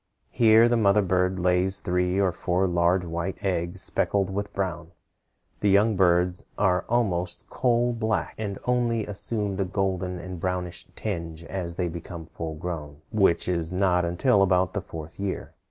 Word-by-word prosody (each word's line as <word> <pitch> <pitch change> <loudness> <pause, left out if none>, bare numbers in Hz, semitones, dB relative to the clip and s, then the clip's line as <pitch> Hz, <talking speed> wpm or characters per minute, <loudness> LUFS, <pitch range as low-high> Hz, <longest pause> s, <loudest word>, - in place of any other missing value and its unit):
Here 115 0 +6
the 120 0 +2
mother 105 -1 +4
bird 90 0 +1
lays 90 +1 +2
three 90 +1 0
or 95 -2 +3
four 90 +2 0
large 90 +1 +2
white 85 +4 -4
eggs 90 0 -1
speckled 100 -2 0
with 100 +1 -3
brown. 85 -3 -4 0.7
The 105 - +2
young 105 +3 +4
birds 90 -1 +2
are 90 -3 +2
almost 90 -7 0
coal 120 -1 +2
black, 110 -1 -1
and 100 -3 -3
only 120 -3 +1
assume 105 0 -1
the 100 - 0
golden 95 -1 -2
and 90 0 -7
brownish 90 -1 -3
tinge 85 -1 -4
as 85 -1 -4
they 90 0 -1
become 85 0 -7
full 80 -1 -6
grown, 75 -3 -6
which 100 -6 +2
is 85 -2 -1
not 90 -1 +2
until 95 +6 +2
about 95 -1 +2
the 100 - -2
fourth 80 0 -9
year. 100 -1 -4
90 Hz, 160 wpm, -26 LUFS, 85-100 Hz, 0.7 s, Here